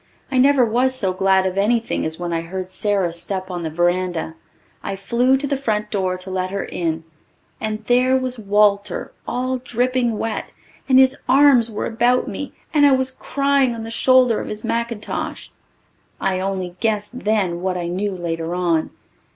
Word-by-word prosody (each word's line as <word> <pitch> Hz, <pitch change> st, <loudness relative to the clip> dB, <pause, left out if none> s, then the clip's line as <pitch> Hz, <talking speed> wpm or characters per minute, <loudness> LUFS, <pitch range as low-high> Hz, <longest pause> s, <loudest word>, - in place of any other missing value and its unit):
I 260 Hz, -, +2 dB
never 270 Hz, -1 st, +5 dB
was 250 Hz, +3 st, +1 dB
so 195 Hz, -7 st, -1 dB
glad 190 Hz, 0 st, +3 dB
of 190 Hz, +1 st, -1 dB
anything 225 Hz, -2 st, +1 dB
as 160 Hz, 0 st, -5 dB
when 175 Hz, -1 st, -3 dB
I 165 Hz, -, 0 dB
heard 185 Hz, +2 st, -6 dB
Sara's 185 Hz, -4 st, -1 dB
step 185 Hz, 0 st, -4 dB
on 175 Hz, -1 st, -4 dB
the 160 Hz, -, -3 dB
verandah. 175 Hz, 0 st, 0 dB, 0.5 s
I 195 Hz, -, -4 dB
flew 240 Hz, +7 st, +2 dB
to 280 Hz, -, -3 dB
the 280 Hz, 0 st, 0 dB
front 215 Hz, -6 st, -2 dB
door 185 Hz, -3 st, -1 dB
to 185 Hz, +1 st, -7 dB
let 185 Hz, 0 st, -1 dB
her 200 Hz, +1 st, -3 dB
in 165 Hz, -1 st, -3 dB, 0.6 s
and 215 Hz, 0 st, -4 dB
there 255 Hz, +2 st, +3 dB
was 255 Hz, -2 st, -2 dB
Walter 205 Hz, -2 st, +1 dB, 0.2 s
all 255 Hz, +1 st, -1 dB
dripping 245 Hz, -2 st, 0 dB
wet 225 Hz, 0 st, -4 dB, 0.4 s
and 260 Hz, -, +6 dB
his 265 Hz, +1 st, +5 dB
arms 265 Hz, -3 st, +5 dB
were 215 Hz, -, -3 dB
about 245 Hz, +2 st, +2 dB
me 275 Hz, +8 st, -5 dB, 0.2 s
and 295 Hz, -2 st, +4 dB
I 280 Hz, -, +5 dB
was 260 Hz, 0 st, +1 dB
crying 275 Hz, -2 st, +1 dB
on 225 Hz, -, -6 dB
the 225 Hz, -, -6 dB
shoulder 255 Hz, -1 st, +4 dB
of -, -, -5 dB
his 210 Hz, 0 st, -6 dB
mackintosh. 235 Hz, -2 st, -3 dB, 0.7 s
I 190 Hz, -1 st, 0 dB
only 185 Hz, -2 st, -3 dB
guessed 220 Hz, +2 st, -1 dB
then 195 Hz, -6 st, 0 dB
what 185 Hz, -1 st, -1 dB
I 175 Hz, -1 st, -3 dB
knew 195 Hz, +3 st, -2 dB
later 165 Hz, -1 st, -3 dB
on. 170 Hz, -3 st, +1 dB
210 Hz, 180 wpm, -21 LUFS, 185-250 Hz, 0.7 s, and